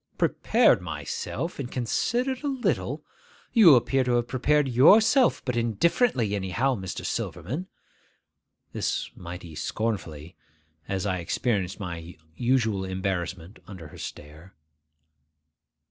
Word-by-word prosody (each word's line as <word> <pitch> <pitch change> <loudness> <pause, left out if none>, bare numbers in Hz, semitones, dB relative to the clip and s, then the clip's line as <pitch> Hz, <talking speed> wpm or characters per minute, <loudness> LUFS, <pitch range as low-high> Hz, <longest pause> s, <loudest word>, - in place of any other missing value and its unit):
'Prepared - - +3
myself; 165 -1 -5
and 130 -3 -5
considered 245 - -1
a - - -1
little! 265 -3 -1 0.5
You 190 - +8
appear 130 +2 +2
to 125 - +1
have 120 0 0
prepared 140 +3 +2
yourself 215 - +5
but 125 -2 -1
indifferently, 120 - +1
anyhow, 105 +7 0
Mr. 95 -6 -5
Silverman.' 125 - -4 1.1
This - - -2
mighty 85 -1 -9
scornfully, 85 -5 -4 0.5
as 95 0 -2
I 95 -2 -1
experienced 95 +1 -1
my 85 -3 -7 0.2
usual 120 -6 +1
embarrassment 95 -1 -4
under 90 -7 -10
her - - -13
stare. 75 +6 -10
110 Hz, 110 wpm, -26 LUFS, 90-135 Hz, 1.1 s, You